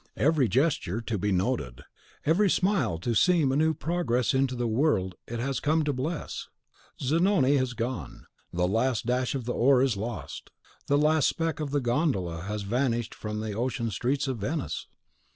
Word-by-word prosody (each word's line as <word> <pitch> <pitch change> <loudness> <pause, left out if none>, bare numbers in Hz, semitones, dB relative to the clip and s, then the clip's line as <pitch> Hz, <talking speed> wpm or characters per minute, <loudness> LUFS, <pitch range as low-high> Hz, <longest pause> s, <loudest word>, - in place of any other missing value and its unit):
Every 150 -3 +3
gesture 125 - +1
to 115 -2 -3
be 105 +2 0
noted, 90 - -1 0.4
every 190 +6 +3
smile 175 - +1
to 115 +8 -2
seem 160 +2 +3
a - - 0
new 160 +2 +2
progress 150 -8 0
into 130 -1 +1
the 120 0 -1
world 110 - +1
it 120 0 -4
has 135 +2 -1
come 155 +1 +2
to 145 -1 0
bless! 150 +6 -4 0.5
Zanoni 150 -1 +3
has 130 -2 0
gone, 120 +2 -5 0.3
the 90 +1 +1
last 115 +5 0
dash 125 +2 0
of 130 -4 -4
the 120 - -1
oar 130 +1 +4
is 130 -7 +1
lost, 115 +3 -6 0.4
the 145 - +3
last 155 0 +3
speck 165 -2 -1
of 150 -2 -2
the 145 0 0
gondola 120 - 0
has 105 +3 -4
vanished 120 +1 -1
from 105 0 -5
the 110 -1 -3
ocean 115 +1 -2
streets 135 +8 -1
of 130 -4 -2
Venice! 140 +9 -3
130 Hz, 175 wpm, -27 LUFS, 115-150 Hz, 0.5 s, oar